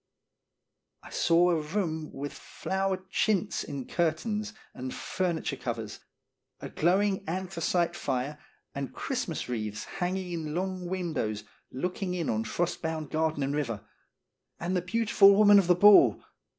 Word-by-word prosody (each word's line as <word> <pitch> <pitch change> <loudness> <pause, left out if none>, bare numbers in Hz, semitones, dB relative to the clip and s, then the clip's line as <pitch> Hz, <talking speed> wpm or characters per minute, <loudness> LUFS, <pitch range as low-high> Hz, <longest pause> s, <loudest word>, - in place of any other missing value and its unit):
I - - -12
saw 175 +1 +4
a 165 -2 +1
room 160 -1 -3
with 145 +1 -6
flowered 190 0 -3
chintz 205 -5 +1
in 140 -3 -6
cur 170 -2 +1
tains 210 +5 -4 0.2
and 130 0 -6
furniture 170 -5 -2
covers, 115 -4 -5 0.6
a - - -7
glowing 190 +4 +1
anthra 185 0 -4
cite 170 0 +1
fire, 135 +2 -2 0.3
and 140 -1 -5
Christmas 245 - -3
wreaths 110 -3 -3
hanging 180 0 -3
in 160 -3 -4
long 185 0 -2
windows 155 - -2 0.3
looking 180 +5 -3
on 110 0 -1
frost 175 0 -2
bound 160 -3 -3
garden 155 -2 0
and 140 +1 -1
river. 120 -8 -3 0.7
And 180 +2 -2
the 180 - +1
beautiful 200 0 +5
woman 205 0 +7
of 190 - +1
the 180 - +5
ball 205 +3 +7
175 Hz, 140 wpm, -29 LUFS, 145-190 Hz, 0.7 s, woman